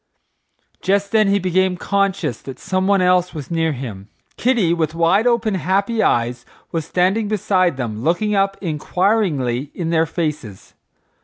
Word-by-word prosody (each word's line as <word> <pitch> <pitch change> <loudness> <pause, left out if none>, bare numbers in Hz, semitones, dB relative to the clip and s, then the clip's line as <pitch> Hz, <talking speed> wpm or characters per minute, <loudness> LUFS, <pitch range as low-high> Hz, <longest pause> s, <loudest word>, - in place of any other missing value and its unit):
Just 200 +1 0
then 215 -2 +3
he 200 0 +3
became 185 0 +1
conscious 195 - -1
that 135 -2 -9
someone 190 0 +1
else 180 -1 +2
was 150 0 -7
near 165 -1 +1
him. 110 -7 -7 0.3
Kitty, 230 -9 +2
with 160 -2 -1
wide 180 +7 +3
open, 235 -3 +1
happy 195 +5 0
eyes, 120 - +1 0.3
was 165 -2 -2
standing 190 +6 +1
beside 185 -6 +1
them 110 -4 -4
looking 175 - 0
up 195 0 +1
inquiringly 155 - 0
in 170 -2 -3
their 165 -1 +2
faces. 150 - -5
180 Hz, 145 wpm, -19 LUFS, 150-200 Hz, 0.3 s, then